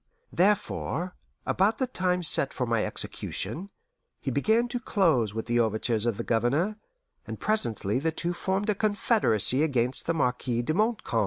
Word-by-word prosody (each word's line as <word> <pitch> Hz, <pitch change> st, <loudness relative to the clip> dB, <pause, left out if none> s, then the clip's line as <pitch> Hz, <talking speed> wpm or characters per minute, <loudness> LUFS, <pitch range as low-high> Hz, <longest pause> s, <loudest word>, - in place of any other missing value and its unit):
Therefore, 185 Hz, -2 st, 0 dB, 0.3 s
about 210 Hz, +4 st, +2 dB
the 260 Hz, -, +1 dB
time 180 Hz, -7 st, -1 dB
set 140 Hz, -3 st, +1 dB
for 125 Hz, -, -1 dB
my 115 Hz, -2 st, +1 dB
execution, 155 Hz, -, -3 dB, 0.5 s
he -, -, -3 dB
began 230 Hz, +2 st, +2 dB
to 245 Hz, 0 st, -3 dB
close 155 Hz, -, +1 dB
with 110 Hz, -, -3 dB
the 120 Hz, 0 st, +1 dB
overtures 110 Hz, 0 st, +1 dB
of 115 Hz, -4 st, 0 dB
the -, -, -3 dB
Governor, 140 Hz, -, 0 dB, 0.5 s
and -, -, -6 dB
presently 125 Hz, -, +1 dB
the 160 Hz, +3 st, 0 dB
two 170 Hz, +2 st, -3 dB
formed 195 Hz, +4 st, -1 dB
a -, -, +1 dB
confederacy 205 Hz, -, +2 dB
against 130 Hz, -5 st, 0 dB
the 165 Hz, -, +1 dB
Marquis 125 Hz, -3 st, 0 dB
de 155 Hz, -, -1 dB
Montcalm. 215 Hz, -, 0 dB
160 Hz, 160 wpm, -27 LUFS, -, 0.5 s, about